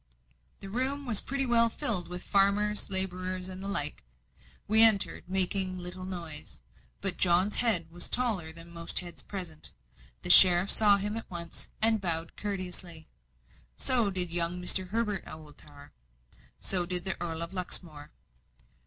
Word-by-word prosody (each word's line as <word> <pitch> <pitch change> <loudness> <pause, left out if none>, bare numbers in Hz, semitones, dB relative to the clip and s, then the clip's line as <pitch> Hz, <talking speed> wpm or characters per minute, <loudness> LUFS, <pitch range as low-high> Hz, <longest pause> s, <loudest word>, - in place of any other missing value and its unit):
The 195 - -10
room 270 +5 -1
was 230 -5 +4
pretty 270 0 -3
well 230 -2 +1
filled 185 -6 0
with 180 +1 -8
farmers' 205 +1 0
labourers 185 -1 0
and 185 0 -10
the 195 - -8
like. 150 - -1 0.6
We 220 +2 +7
entered, 220 -3 +4
making 190 0 +1
little 180 +1 -7
noise; 170 -5 -7 0.4
but - - 0
John's 185 +3 +1
head 180 -9 +2
was 175 +1 -5
taller 215 -10 -1
than 165 +1 -11
most 170 0 -1
heads 175 -1 -11
present; 175 -6 -8 0.5
the - - +6
sheriff 180 +1 +8
saw 205 -2 +4
him 210 +2 -5
at 225 - -10
once, 170 -2 -8
and 225 -2 +3
bowed 165 -3 -3
courteously. 180 -5 -7 0.7
So 235 -5 0
did 180 -3 -5
young 170 +1 +1
Mr. 185 +1 +4
Herbert 210 -1 -4
Oldtower, 150 -2 -14 0.7
so 180 -3 0
did 180 0 0
the 190 - -1
Earl 165 -1 -5
of 170 - -10
Luxmore. 165 -5 -4
185 Hz, 150 wpm, -26 LUFS, 170-205 Hz, 0.7 s, sheriff